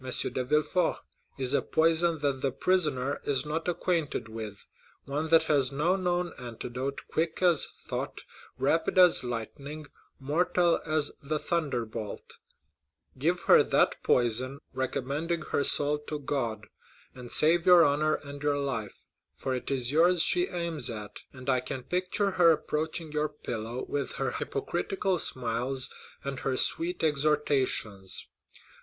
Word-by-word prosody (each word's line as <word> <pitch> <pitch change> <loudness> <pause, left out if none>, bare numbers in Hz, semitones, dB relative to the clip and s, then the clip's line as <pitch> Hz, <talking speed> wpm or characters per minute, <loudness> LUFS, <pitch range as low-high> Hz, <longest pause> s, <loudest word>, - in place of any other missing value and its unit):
de 130 - -2
Villefort, 150 +6 +1 0.4
is 130 0 +1
a - - +3
poison 165 +1 +2
that 140 -2 0
the 135 - +1
prisoner 145 -4 0
is 140 0 -1
not 160 +3 -3
acquainted 170 -7 -1
with,—one 115 +7 -7
that 165 0 +6
has 140 -4 +2
no 155 +7 +1
known 180 -2 -1
antidote, 125 +2 -5
quick 160 0 -1
as 175 -4 +4 0.2
thought, - - -4 0.4
rapid 145 +8 +1
as 180 -6 +6
lightning, 140 +6 -5 0.3
mortal 170 +5 +2
as 155 -1 +2
the 150 +2 -1
thunderbolt; 120 - -3 0.8
give 170 +5 +1
her - - +6
that - - +2
poison, 125 +3 +1 0.2
recommending 140 +6 -2
her 140 - +2
soul 145 +1 +2
to 150 0 -5
God, 120 -7 -3 0.5
and 125 -2 -10
save 170 +3 +4
your 180 -2 +8
honor 150 +2 +2
and 140 0 -9
your 145 -1 +1
life, 125 -8 -4 0.3
for 130 - -3
it 125 - -4
is 130 -2 -1
yours 170 +2 +4
she 180 +1 +2
aims 170 -3 -2
at; 105 -3 -7
and 130 -1 -12
I 130 -2 +3
can 130 +1 -4
picture 185 +6 0
her 175 -2 +5
approaching 155 +1 -3
your 150 0 0
pillow 120 -4 -5
with 145 -1 -3
her - - -2
hypocritical 195 - -2
smiles 125 +1 -1 0.3
and 140 -1 -4
her 130 -1 -1
sweet 175 +1 +1
exhortations. 140 -10 0
145 Hz, 135 wpm, -29 LUFS, 130-165 Hz, 0.8 s, your